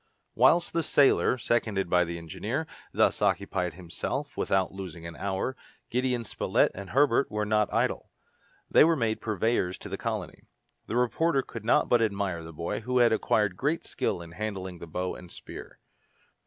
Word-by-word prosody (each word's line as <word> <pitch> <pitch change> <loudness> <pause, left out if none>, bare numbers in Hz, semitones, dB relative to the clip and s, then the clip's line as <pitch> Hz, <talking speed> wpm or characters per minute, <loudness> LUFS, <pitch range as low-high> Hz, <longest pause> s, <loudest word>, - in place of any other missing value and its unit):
Whilst 170 +1 +4
the 165 - +2
sailor, 140 -4 +4
seconded 110 -5 0
by 90 0 +3
the 85 0 -5
engineer, 85 -2 -3 0.3
thus - - +2
occupied 90 -2 0
himself 95 - -4
without 95 -1 +1
losing 90 -4 -8
an 85 0 -7
hour, 100 +6 -2 0.4
Gideon 125 -1 0
Spilett 110 - +1
and 100 0 -8
Herbert 140 +1 +3
were 105 0 -1
not 105 0 +2
idle. - - 0 0.6
They - - +6
were 165 +1 +4
made 115 -6 -1
purveyors 110 -3 0
to - - -9
the - - -5
colony. - - -4 0.5
The 110 - -3
reporter 135 +4 +2
could 115 -3 -9
not 115 - +4
but 120 - +4
admire 100 -5 -1
the 80 - -9
boy, 85 +6 -3
who 125 +3 -1
had 120 -2 +5
acquired 105 -3 +1
great 150 - -1
skill 85 - -2
in 85 - -12
handling 95 -1 -5
the 85 - -8
bow 90 +3 -3
and 90 -1 -11
spear. - - -10
105 Hz, 170 wpm, -28 LUFS, 90-125 Hz, 0.6 s, They